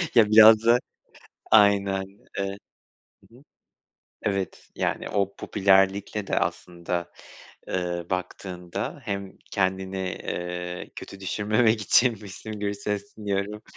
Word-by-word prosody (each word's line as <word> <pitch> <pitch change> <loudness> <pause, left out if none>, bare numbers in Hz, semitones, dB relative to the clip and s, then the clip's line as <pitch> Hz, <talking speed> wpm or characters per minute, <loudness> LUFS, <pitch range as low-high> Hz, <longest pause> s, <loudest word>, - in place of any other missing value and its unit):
Ya 110 -3 +6
biraz 110 0 +8
da 120 +1 +6 0.7
aynen. 100 -2 +4 0.3
Evet. 100 0 -3 0.7
Hı - - -21
hı. 130 - -18 0.8
Evet. 100 -3 -3
Yani, - - -2
o 100 -1 0
popülerlikle 100 +1 +2
de - - +1
aslında, 85 0 -3 0.6
ııı, 90 -2 -2
baktığında 90 -1 -4
hem 100 -1 -5
kendini, 95 -1 -1
eee, 90 -1 -4
kötü 100 - -9
düşürmemek 110 +3 +1
için 120 +4 +5
Müslüm 105 +2 -8
Gürses 100 0 -3
dinliyorum, 105 0 -3
100 Hz, 105 wpm, -25 LUFS, 95-105 Hz, 0.8 s, biraz